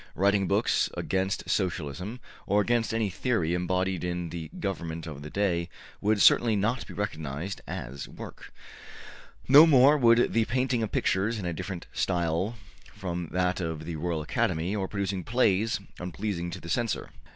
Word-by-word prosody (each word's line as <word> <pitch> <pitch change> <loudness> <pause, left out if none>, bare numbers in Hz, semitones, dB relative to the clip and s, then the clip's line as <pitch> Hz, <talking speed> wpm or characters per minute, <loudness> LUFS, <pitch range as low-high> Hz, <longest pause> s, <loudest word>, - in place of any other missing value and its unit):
Writing 100 +1 +2
books - - +2
against 95 +1 -1
Socialism, 90 - -2 0.3
or 100 +1 +3
against 115 +2 +1
any 110 -3 0
theory 90 -4 0
embodied 90 +1 0
in 90 -1 -2
the 80 -1 -6
government 85 -5 -4
of 75 -4 -7
the 75 - -7
day, 90 -3 0 0.3
would 105 +1 +2
certainly 115 +2 +6
not 105 +6 0
be - - -9
recognized 80 -2 -4
as 65 +2 -6
work. - - -10 1.0
No 145 +5 +9
more 145 0 +6
would 115 -1 +4
the 115 -1 +3
painting 125 0 0
of 110 - -2
pictures 105 +5 +1
in 100 - -5
a 85 - -1
different 90 +1 -5
style 85 +5 0 0.4
from 90 -4 -4
that 90 +2 0
of 80 -2 -4
the 85 0 -4
Royal 80 0 -2
Academy, 80 +5 0
or 95 -2 -1
producing 100 -2 -2
plays 110 -2 +2 0.2
unpleasing 90 0 -3
to - - -6
the - - -10
censor. 115 - -1
95 Hz, 160 wpm, -28 LUFS, 85-110 Hz, 1.0 s, No